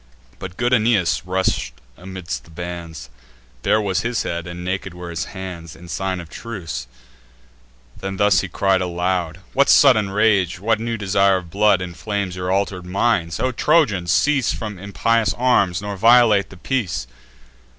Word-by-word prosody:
But 90 0 -8
good 120 +1 +1
Aeneas 105 -8 +2
rush'd 95 -9 -1 0.2
amid 95 +1 -9
the 60 +1 -5
bands; 85 -6 -7 0.5
Bare 110 - +2
was 100 -2 0
his 120 0 -1
head, 85 0 -4
and 90 0 -7
naked 95 -1 -3
were 90 -1 -7
his 85 0 -3
hands, 90 -4 -8
In 90 - -13
sign 95 +2 -2
of 85 - -8
truce: 80 - -6 1.1
then 95 0 -5
thus 105 -1 +4
he 95 - -4
cries 95 +1 +1
aloud: 90 -1 -2
"What 140 +1 +3
sudden 110 -8 +6
rage, 95 -4 +2
what 110 +2 +1
new 115 0 -3
desire 100 -1 +2
of 90 -3 -8
blood, 100 -2 +3
Inflames 95 +2 -4
your 90 0 -3
alter'd 95 -2 -1
minds? 90 -4 0
O 130 - 0
Trojans, 120 - +2
cease 140 -5 +2
From 105 -4 -5
impious 110 +3 0
arms, 100 -8 +2
nor 100 -1 -4
violate 115 -1 +5
the 95 - -13
peace! 90 - -2
95 Hz, 160 wpm, -21 LUFS, 90-105 Hz, 1.1 s, sudden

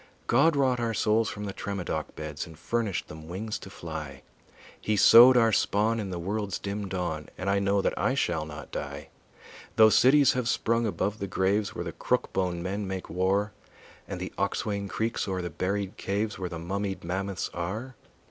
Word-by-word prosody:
God 145 +7 +4
wrought 130 -3 +2
our 115 -1 -1
souls 110 +1 +2
from 105 - -6
the 100 -1 -4
Tremadoc 100 -3 -4
beds 75 +1 -5
And 80 -2 -13
furnished 110 +2 -2
them 80 0 -10
wings 105 +5 -4
to - - -10
fly; 80 -7 -7 0.6
He 110 - 0
sowed 120 +5 +9
our 115 -2 +5
spawn 110 +2 +2
in 100 -3 -3
the 90 - -4
world's 100 +2 -2
dim 100 0 -4
dawn, 85 -5 -3
And 90 - -5
I 100 - +2
know 100 0 +1
that - - 0
I 130 - +1
shall 85 - 0
not 75 -1 -9
die, - - -6 0.7
Though 110 -1 +7
cities 135 +3 +6
have 125 -2 -1
sprung 115 +1 +1
above 105 0 -2
the 100 - -3
graves 100 +2 0
Where - - -4
the - - -4
crook - - -1
bone 90 -2 -1
men 100 +2 -3
make 95 -1 -5
war 95 +4 +1 0.6
And - - -5
the - - -5
oxwain 100 -1 -1
creaks 115 0 -2
o'er 95 -2 -2
the 85 - -4
buried 100 +1 -2
caves 105 +2 -2
Where 90 -1 -3
the 85 - -5
mummied 95 +3 -3
mammoths 95 +2 -3
are. 105 +10 -4
100 Hz, 190 wpm, -28 LUFS, 90-110 Hz, 0.7 s, sowed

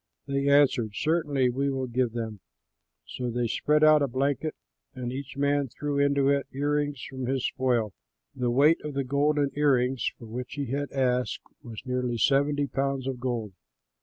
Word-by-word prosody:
They 140 0 0
answered, 135 -6 +4
"Certainly, 145 -5 +1
we 140 +3 0
will 135 -1 -2
give 125 -1 -1
them." 110 -3 -4 0.7
So 125 -1 -4
they 120 +1 -1
spread 150 +6 +1
out 155 -1 +7
a 140 - +2
blanket 140 +4 -1 0.4
and 125 -1 -4
each 140 +1 -7
man 140 0 +1
threw 140 +3 -3
into 140 -1 +3
it 140 -1 +1
the - - -13
ear 145 +1 0
rings 145 -2 -2
from 130 -2 -5
his 130 -1 0
spoil. 120 -5 0 0.4
The 125 -1 0
weight 145 +7 +4
of 150 -2 -5
the 140 - 0
golden 140 +2 +1
ear 145 -2 +4
rings 125 +1 0
for 115 - -11
which 120 +3 -6
he 140 -4 -4
had 145 +1 -2
asked 125 -2 0 0.2
was 115 -3 -9
nearly 125 -2 -1
seventy 145 +4 +2
pounds 135 -1 -2
of 130 -2 -3
gold. 120 -5 -3
135 Hz, 185 wpm, -27 LUFS, 125-145 Hz, 0.7 s, out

